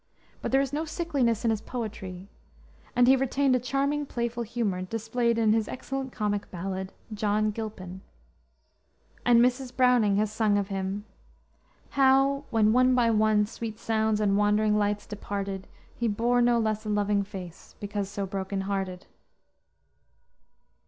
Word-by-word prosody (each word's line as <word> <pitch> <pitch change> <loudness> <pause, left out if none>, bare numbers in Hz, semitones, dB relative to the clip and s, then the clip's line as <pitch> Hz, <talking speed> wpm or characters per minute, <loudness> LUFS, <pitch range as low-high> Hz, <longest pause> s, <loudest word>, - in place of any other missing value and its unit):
But - - -3
there 270 - +4
is 275 0 -3
no 305 +2 0
sickliness 290 - -1
in 230 - +3
his 215 -1 -1
poetry, 195 -7 -6 0.7
and 245 0 +5
he 265 - +7
retained 270 0 +2
a - - +2
charming 280 +3 -1
playful 235 -1 -3
humor 225 -5 -2
displayed 225 +4 -1
in 220 -2 +3
his 220 -1 +1
excellent 270 0 -5
comic 205 -3 -2
ballad, 190 +1 -4 0.2
John 210 0 +1
Gilpin; 205 -4 -7 1.2
and 240 -1 +5
Mrs. 250 +1 +1
Browning 250 -6 +4
has 210 +1 +1
sung 215 -2 +2
of 200 0 -1
him, 195 +1 -3 0.9
"How 275 +1 +3
when 220 -1 +3
one 255 +1 +4
by 235 -2 +3
one 215 -1 +3
sweet 220 0 -6
sounds 220 -1 0
and 200 -2 +2
wandering 210 +1 +3
lights 205 0 0
departed 200 -2 -5 0.3
He 235 - -1
bore 235 +3 +2
no 240 0 +4
less 215 -1 0
a 215 - -5
loving 205 -1 +1
face, 190 -4 -9
because 205 -1 -3
so 200 -1 -3
broken 195 0 -3
hearted." 190 -1 -3
215 Hz, 150 wpm, -27 LUFS, 205-245 Hz, 1.2 s, he